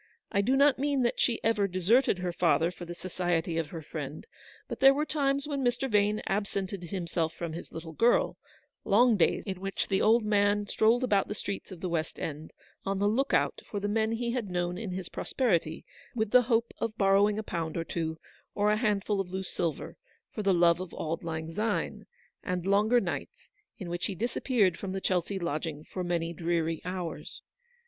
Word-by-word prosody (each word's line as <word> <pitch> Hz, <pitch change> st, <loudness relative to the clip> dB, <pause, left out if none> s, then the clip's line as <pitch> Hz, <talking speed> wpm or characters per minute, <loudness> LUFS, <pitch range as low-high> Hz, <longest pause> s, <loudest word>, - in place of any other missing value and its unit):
I 200 Hz, -, +2 dB
do 250 Hz, +6 st, +1 dB
not 280 Hz, 0 st, +4 dB
102 -, -, -3 dB
mean 280 Hz, -2 st, +1 dB
that 240 Hz, -, 0 dB
she 235 Hz, -2 st, +2 dB
ever 215 Hz, -3 st, +2 dB
deserted 195 Hz, +5 st, +3 dB
her 180 Hz, -1 st, -3 dB
father 170 Hz, 0 st, +2 dB
for 180 Hz, -1 st, -9 dB
the 175 Hz, 0 st, -7 dB
society 175 Hz, -2 st, -1 dB
of 160 Hz, -, -2 dB
her 160 Hz, +1 st, -7 dB
friend; 150 Hz, 0 st, -6 dB, 0.4 s
but -, -, -6 dB
there 270 Hz, 0 st, +7 dB
were 300 Hz, +2 st, 0 dB
times 280 Hz, -2 st, 0 dB
when 280 Hz, -2 st, -2 dB
Mr. 245 Hz, +2 st, +1 dB
Vane 210 Hz, -2 st, +2 dB
absented 195 Hz, -2 st, -2 dB
himself 170 Hz, -3 st, -2 dB
from 170 Hz, -2 st, -4 dB
his 170 Hz, -, -8 dB
little 165 Hz, 0 st, -7 dB
girl; 235 Hz, +9 st, +2 dB, 0.4 s
long 230 Hz, +3 st, +5 dB
days, 180 Hz, -, +2 dB
in 190 Hz, -3 st, -5 dB
which 195 Hz, 0 st, -3 dB
the 195 Hz, -, +2 dB
old 225 Hz, +2 st, +4 dB
man 205 Hz, 0 st, +2 dB
strolled 225 Hz, +4 st, +3 dB
about 205 Hz, -6 st, +2 dB
the 210 Hz, -, -4 dB
streets 200 Hz, -2 st, -5 dB
of 180 Hz, -3 st, -9 dB
the 185 Hz, -, -2 dB
West 165 Hz, -2 st, -2 dB
End, 155 Hz, 0 st, -5 dB, 0.3 s
on 195 Hz, 0 st, -1 dB
the 200 Hz, +1 st, +2 dB
look 250 Hz, +6 st, +1 dB
out -, -, +1 dB
for 205 Hz, -, -3 dB
the 205 Hz, -, -2 dB
men 220 Hz, +1 st, +1 dB
he 235 Hz, +1 st, -1 dB
had 235 Hz, -5 st, -2 dB
known 175 Hz, 0 st, -1 dB
in 205 Hz, +2 st, -5 dB
his 185 Hz, -1 st, -4 dB
prosperity, 170 Hz, -, -1 dB, 0.3 s
with 220 Hz, -2 st, -1 dB
the 250 Hz, -, +7 dB
hope 235 Hz, -1 st, +1 dB
of 225 Hz, -1 st, -3 dB
borrowing 200 Hz, +1 st, +4 dB
a 220 Hz, -, -2 dB
pound 165 Hz, -5 st, -3 dB
or 165 Hz, -, -1 dB
two, 160 Hz, -1 st, -3 dB, 0.4 s
or 210 Hz, +1 st, +3 dB
a 210 Hz, -, +2 dB
hand 210 Hz, -4 st, +1 dB
ful 205 Hz, -2 st, +1 dB
of 185 Hz, -, -7 dB
loose 190 Hz, 0 st, -4 dB
silver, 160 Hz, 0 st, -3 dB, 0.3 s
for 215 Hz, -, -4 dB
the 200 Hz, -1 st, +2 dB
love 170 Hz, -1 st, +4 dB
of 185 Hz, -2 st, -6 dB
Auld 165 Hz, +2 st, -3 dB
Lang 160 Hz, 0 st, -4 dB
Syne; 220 Hz, +5 st, -2 dB, 0.4 s
and 180 Hz, -1 st, -2 dB
longer 210 Hz, +5 st, +4 dB
nights, -, -, -5 dB, 0.3 s
in 190 Hz, -5 st, -7 dB
which 175 Hz, +1 st, -2 dB
he 195 Hz, -, -4 dB
disap 235 Hz, +7 st, -3 dB
peared 205 Hz, -10 st, +3 dB
from 190 Hz, -2 st, -4 dB
the 190 Hz, -, -3 dB
Chelsea 185 Hz, +1 st, 0 dB
lodgiDg 155 Hz, -3 st, -3 dB
for 185 Hz, -, -5 dB
many 170 Hz, -1 st, -1 dB
dreary 165 Hz, -1 st, -1 dB
hours. 180 Hz, -2 st, -5 dB
195 Hz, 210 wpm, -29 LUFS, 170-220 Hz, 0.4 s, there